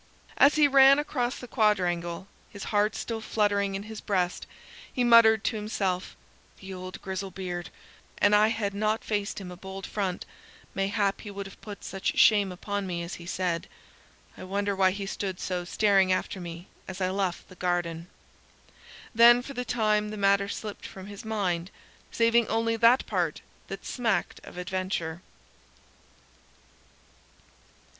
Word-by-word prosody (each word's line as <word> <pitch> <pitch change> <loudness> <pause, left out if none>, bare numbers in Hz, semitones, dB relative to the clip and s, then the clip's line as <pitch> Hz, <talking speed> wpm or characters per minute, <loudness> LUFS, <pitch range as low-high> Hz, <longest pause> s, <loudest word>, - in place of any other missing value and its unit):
As 280 - +6
he 300 -1 +6
ran 275 0 +7
across 265 -4 -1
the 250 - -9
quadrangle, 180 -6 0 0.2
his 200 - -9
heart 210 +1 +2
still 225 -1 -4
fluttering 205 -2 0
in 195 - -4
his 220 0 -8
breast, 180 -3 -1 0.4
he 250 - 0
muttered 230 -2 +6
to 220 - 0
himself, 195 -3 -2 0.4
"The 190 0 -8
old 185 0 -7
grizzle 190 0 -4
beard; 180 -2 -5 0.5
an 205 - +4
I 210 +1 +6
had 220 -3 -1
not 215 +2 0
faced 205 -1 -2
him 185 -2 -8
a - - -8
bold 190 +1 -8
front, 190 -4 -3 0.5
mayhap 200 0 0
he 210 - -8
would 200 0 -6
have 195 - -12
put 205 -2 -9
such 195 -1 -3
shame 205 -3 +5
upon 200 +2 -4
me 170 -1 -3
as 170 - -6
he 170 - -10
said. 175 -2 -2 0.7
I - - -10
wonder 200 +2 -1
why 190 -1 +4
he 200 +1 -4
stood 195 -2 -4
so 180 -1 -3
staring 195 0 +3
after 185 +1 -1
me 170 +1 -8 0.2
as 190 0 -7
I 185 -1 0
left 190 -2 -2
the - - -14
garden." 175 -2 -2 1.1
Then 240 +1 +7
for 275 - -8
the 250 - -3
time 215 -3 +1
the 215 - -6
matter 200 0 +3
slipped 210 -1 -6
from 190 -1 -10
his 205 0 -9
mind, 190 -6 -1 0.4
saving 230 0 +3
only 230 0 0
that 230 +3 +5
part 175 -7 -1 0.3
that 195 - -7
smacked 225 -8 -1
of - - -12
adventure. 180 -3 -3
200 Hz, 160 wpm, -27 LUFS, 185-220 Hz, 1.1 s, ran